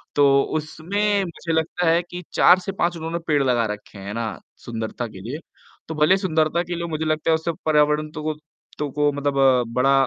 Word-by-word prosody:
तो 140 -1 +5 0.2
उसमें 195 +7 -1
मुझे 170 -1 -5
लगता 160 +2 0
है 170 +1 +4
कि 175 +1 -8
4 180 +1 +6
से 195 +2 -4
5 175 -2 0
उन्होंने 165 +1 -3
पेड़ 150 -2 +3
लगा 120 -3 +2
रखें, 105 -1 -9
हैं 100 +1 -6
ना? 110 -5 -4 0.2
सुंदरता 115 +1 -4
के 95 - -11
लिए। 125 +10 -5 0.5
तो 160 - -5
भले 155 +6 +4
सुंदरता 165 -2 +1
के 175 0 -4
लिए 170 0 -3
मुझे 160 -1 -3
लगता 155 0 0
है - - +5
उससे 160 +1 -2
पर्यावरण 150 0 +3
तो 155 -1 -7
को 155 - -1 0.5
तो 150 -1 -1
को 145 +1 +2
मतलब 145 0 -1 0.4
बड़ा 135 +2 +3
155 Hz, 205 wpm, -23 LUFS, 140-170 Hz, 0.5 s, 4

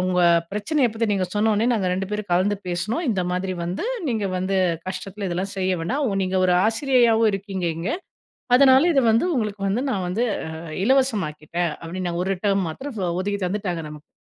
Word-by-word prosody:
உங்க 180 -1 +1 0.3
பிரச்சனையை 245 +7 +1
பத்தி 225 +1 -1
நீங்க 190 -2 0
சொன்னோனே 215 +1 +2
நாங்க 200 -5 0
2 190 +1 -2
பேரும் 210 -1 -3
கலந்து 190 +4 +2
பேசுனோம். 215 - -2
இந்த 190 -4 0
மாதிரி 185 +1 -2
வந்து 175 - -3 0.2
நீங்க 220 -4 -1
வந்து 185 +1 -1 0.3
கஷ்டத்தில 195 +1 -5
இதெல்லாம் 185 +3 -3
செய்ய 185 -1 0
வேணாம். 270 - -1 0.2
நீங்க 190 0 -1
ஒரு 180 -1 +3
ஆசிரியையாவும் 230 -2 +3
இருக்கீங்க 195 -2 -3
இங்க. 170 +8 -3 0.7
அதனால 265 0 +7
இத 275 - +4
வந்து 225 +8 +3
உங்களுக்கு 210 -4 -2
வந்து 210 +6 0
நான் 190 -6 -1
வந்து 210 +7 0 0.2
ஆ - - -6 0.3
இலவசமாக்கிட்டேன்." 175 - 0
அப்டின்னு 180 +2 -4
நா 170 - -3
ஒரு 195 +1 0
டெர்ம் 195 -2 +2
மாத்திரம் 250 - -6 0.2
ஒதுக்கி 200 +1 -2
தந்துட்டாங்க 180 -3 -2
நமக்கு. 150 0 -12
195 Hz, 175 wpm, -23 LUFS, 180-225 Hz, 0.7 s, அதனால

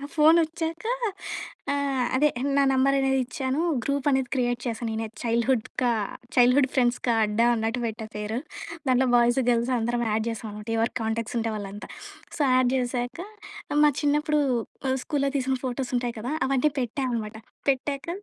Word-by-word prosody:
నా 280 - -6
ఫోన్ 315 +1 +6
వచ్చాక 325 +3 -4 0.9
ఆహ్, 275 -3 0
అదే 300 +3 +4 0.3
నా 280 - +5
నంబర్ 270 +1 +3
అనేది 270 0 +2
ఇచ్చాను. 260 +3 -2 0.2
గ్రూప్ 280 0 -1
అనేది 265 -2 +1
క్రియేట్ 245 -2 0
చేశాను 230 0 -2
నేనే 220 0 -2 0.2
చైల్డ్‌హుడ్ 235 0 +1 0.2
కా 245 - +3 0.4
చైల్డ్‌హుడ్ 250 +2 +5
ఫ్రెండ్స్‌కా 245 -1 +2
అడ్డా 210 +3 +1
అన్నట్టు 225 +2 -1
పెట్టా 220 0 -5
పేరు. 210 +3 -3 0.5
దాంట్లో 255 +1 +4
బాయ్స్ 240 +2 +4
గర్ల్స్ 240 +1 +2
అందరం 240 +1 0
యాడ్ 220 +1 0
చేసాం 225 0 -6
అనమాట. 210 +1 -9
ఎవరు 230 +2 +1
కాంటాక్ట్స్ 225 +1 -2
ఉంటే 225 0 -1
వాళ్ళంతా. 205 0 -7 0.5
సో - - -10 0.2
యాడ్ 255 -1 +3
చేశాక 245 +2 -2 0.7
మా 295 - +6
చిన్నప్పుడు 300 +1 +2 0.5
మా 260 - +2
స్కూల్‌లో 280 -2 0
తీసిన 265 0 0
ఫోటోస్ 255 0 -3
ఉంటాయి 240 -1 -1
కదా! 250 +6 -3
అవన్నీ 275 +2 +2
పెట్టా 250 +3 -2
అనమాట. 220 -2 -3 0.3
పెట్టాక 275 +2 -2
250 Hz, 160 wpm, -26 LUFS, 230-275 Hz, 0.9 s, ఫోన్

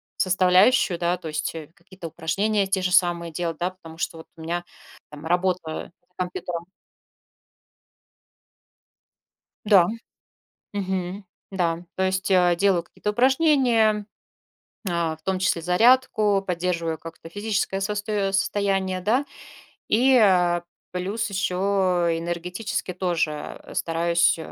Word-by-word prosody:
составляющую, 185 +2 +4
да. 175 +1 0
То 170 -2 -9
есть, 155 +1 -3
э, 155 -2 -7
какие-то 180 -1 -10
упражнения 195 +6 0
те 190 -1 0
же 180 0 -1
самые 170 -2 +2
делать, 165 -1 -3
да, 180 +2 -1
потому 165 -3 -14
что 165 0 -3
вот 160 - -12
у - - -11
меня, 170 +2 -3 0.5
там, 150 +1 -10
работа 175 -2 -1 0.2
за - - -41
компьютером. 180 -2 -4 3.0
Да. 195 -5 +6 0.9
Мгм. 190 0 -3 0.3
Да, 175 -2 -1
то 190 - 0
есть, 190 0 0
а, 180 -2 +4
делаю 190 -2 +2
какие-то 210 - -5
упражнения. 245 -5 +3 0.8
А, 170 -2 -1
в 160 - -31
том 190 +1 -1
числе 185 -2 +1
зарядку, 210 +2 +3
поддерживаю 170 -2 -1
как-то 165 +1 -11
физическое 205 0 -2
состоё 205 -1 -1
состояние, 195 -1 0
да. 235 +9 +1 0.6
И, 255 +5 +4
э, 180 -7 +4 0.3
плюс 195 +5 -2
еще 190 -2 -1 0.6
энергетически 180 +3 -4
тоже 170 -5 -2
стараюсь, 170 +1 +2
185 Hz, 115 wpm, -24 LUFS, 170-200 Hz, 3.0 s, Да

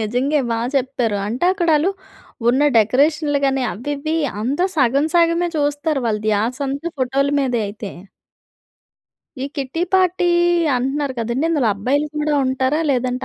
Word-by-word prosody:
నిజంగా 250 +7 0
బాగా 230 +1 -1
చెప్పారు. 250 -5 -1
అంటే 235 +9 -2
అక్కడ 350 -3 -2
వాళ్ళు 320 +6 +2 0.6
ఉన్న 260 +4 +3
డెకరేషన్‌లు 290 +7 +2
గాని, 270 -1 +1
అవి 270 +7 -5
ఇవి 310 +3 -2 0.2
అంతా 280 +10 0
సగం 275 +2 +2
సగమే 340 0 +3
చూస్తారు. 290 0 0
వాళ్ళ 210 -1 -1
ధ్యాసంతా 265 +8 -1
ఫోటోలు 275 +2 0
మీద 255 -3 -1
అయితే. 205 0 -7 1.5
ఈ - - -2
కిట్టి 275 +5 -3
పార్టీ 370 -1 +2 0.5
అంటున్నారు 270 +2 -1
కదండీ! 235 +5 -1
ఇందులో 280 -9 +2
అబ్బాయిలు 275 +9 0
కూడా 300 0 0
ఉంటారా? 260 +4 0
లేదంటే 250 0 -1
275 Hz, 135 wpm, -19 LUFS, 245-300 Hz, 1.5 s, ఉన్న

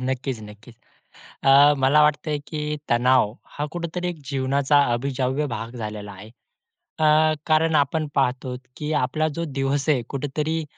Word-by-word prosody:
नक्कीच, 130 -2 -3
नक्कीच. 105 +3 -13 0.7
अ, 140 +2 +7
मला 150 +3 +5
वाटतंय 150 0 +1
की 150 -1 -3
तणाव 120 -2 +3 0.2
हा 150 - -1
कुठेतरी 175 +1 -4
एक 175 - -6
जीवनाचा 140 +1 +2
अविभाज्य 130 +3 -1
भाग 115 +1 -6
झालेला 105 -3 -6
आहे. 100 +2 -12 0.7
अ, 155 0 +4
कारण 160 0 +2
आपण 150 +2 +1
पाहतो 125 -1 -1 0.2
की 150 0 -4
आपला 155 +5 0
जो 170 - -1
दिवस 140 0 -2
आहे, 140 -5 +3
कुठेतरी 150 +3 -2
140 Hz, 140 wpm, -23 LUFS, 125-150 Hz, 0.7 s, अ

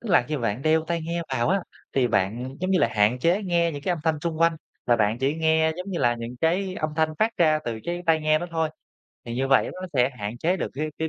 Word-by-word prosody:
Tức 235 - -8
là 175 - +6
khi 155 - -1
bạn 120 0 -2
đeo 160 0 +3
tai 170 0 -1
nghe 170 +1 -2
vào 120 0 +1
á, 195 +2 +2 0.3
thì 130 -2 +2
bạn, 120 +7 -1
giống 185 +1 -1
như 190 - +3
là, 115 - +3
hạn 110 +3 +2
chế 175 +9 +2
nghe 170 -3 +1
những 145 -1 -7
cái 180 - 0
âm 175 - -3
thanh 160 -2 +1
xung 160 0 -3
quanh, 165 -1 +4 0.3
và 120 - +4
bạn 110 +1 +1
chỉ 135 +3 +1
nghe, 160 0 +2
giống 180 +2 -6
như 175 - -2
là, 120 0 +2
những 120 +1 -7
cái 185 +3 +1
âm 155 -3 -2
thanh 160 -1 +3
phát 220 +1 +3
ra 155 -2 +4
từ 115 -2 -3
cái 175 +1 -3
tai 160 -1 +4
nghe 155 0 +3
đó 175 - -4
thôi. 160 -1 0 0.6
Thì 120 - -5
như 135 +2 -1
vậy 135 -1 +4
nó 185 - -9
sẽ 130 -1 +3
hạn 105 +3 -5
chế 175 +7 +1
được - - -3
cái 150 +3 -2
cái 160 - -1
155 Hz, 280 wpm, -25 LUFS, 125-170 Hz, 0.6 s, là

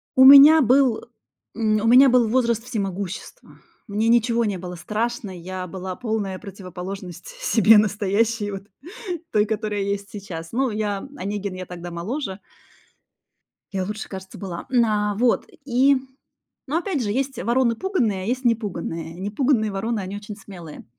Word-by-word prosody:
У 260 - +7
меня 285 +3 +10
был, 255 -1 +4 0.6
э, - - -9
м, 215 -1 +2
у 225 - 0
меня 260 +3 +8
был 245 -2 +4
возраст 235 -2 +1
всемогущества. 200 - -5 0.3
Мне 215 +2 -1
ничего 235 0 +3
не 200 -3 -1
было 180 0 -7
страшно, 220 +2 -3
я 185 +1 -6
была 185 +1 -6
полная 215 -5 -3
противоположность 185 - -8
себе 225 - +5
настоящей, 210 +1 0
вот 195 0 -6 0.7
той, 210 0 +3
которая 210 -1 -2
есть 200 0 -3
сейчас. 170 -5 -8
Ну, 260 0 0
я 210 +2 -3
"Онегин, 200 0 -4
я 185 0 -6
тогда 175 0 -8
моложе" 195 - -4 1.3
"я 190 -1 -1
лучше, 210 +3 -5
кажется, 190 -1 -9
была". 180 -4 -7 0.2
А, 210 -1 0
вот, 240 +2 +1 0.2
и 265 +2 +4 0.7
ну, 305 +4 0
опять 340 -6 -2
же, 205 - -2
есть 265 +1 -2
вороны 235 -1 +2
пуганые, 225 - -1
а - - -5
есть 250 +2 -2
непуганые. 170 -7 -2
Непуганые 215 +3 0
вороны- 215 +3 -2
они 190 +2 -6
очень 205 0 -9
смелые. 175 -6 -11
210 Hz, 150 wpm, -23 LUFS, 190-235 Hz, 1.3 s, меня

